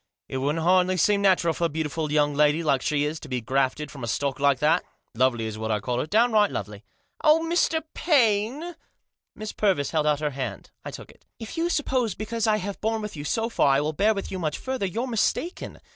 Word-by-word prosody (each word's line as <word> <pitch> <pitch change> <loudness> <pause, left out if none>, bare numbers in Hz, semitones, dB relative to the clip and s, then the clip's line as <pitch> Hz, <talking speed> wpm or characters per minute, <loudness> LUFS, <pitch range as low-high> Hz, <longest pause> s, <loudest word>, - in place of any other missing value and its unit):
It 130 - -4
wouldn't 145 +5 -1
hardly 185 +1 +3
seem 200 +4 +3
natural 185 -4 +3
for 170 - -1
a - - +1
beautiful 155 0 -3
young 145 -1 +2
lady 150 +3 +3
like 140 -4 +2
she 145 +1 0
is 150 +2 -2
to 150 - -11
be 125 -1 -1
grafted 135 +5 -1
from 135 -4 -9
a - - -3
stock 140 +4 -1
like 140 -1 +3
that. 150 +4 +2 0.3
Lovely 120 -1 +1
is 110 -1 -5
what 110 0 -3
I 105 -1 +1
call 125 +4 -2
her, 150 - -2
downright 215 0 +3
lovely." 105 0 -6 0.4
"Oh, 310 +1 +5
Mr. 330 -2 +1
Paine!" 265 - +1 0.6
Miss 215 0 -6
Purvis 185 -10 0
held 155 -2 +1
out 150 -1 +2
her 150 -1 -1
hand. 130 -8 -6
I - - -6
took - - -10
it. - - -26
" - - -57
If 225 - -7
you 335 +1 0
suppose 260 - 0
because 225 +1 -2
I 215 -1 +3
have 200 0 -5
borne 220 0 -1
with 210 - -6
you 145 - -6
so 225 +10 -1
far 140 -11 +3
I - - +3
will 155 +2 -2
bear 210 +6 +2
with 195 - -5
you 190 - -4
much 155 -4 -2
further, 260 -6 -3
you're 225 +7 -3
mistaken. 260 - -2
165 Hz, 235 wpm, -25 LUFS, 140-215 Hz, 0.6 s, Oh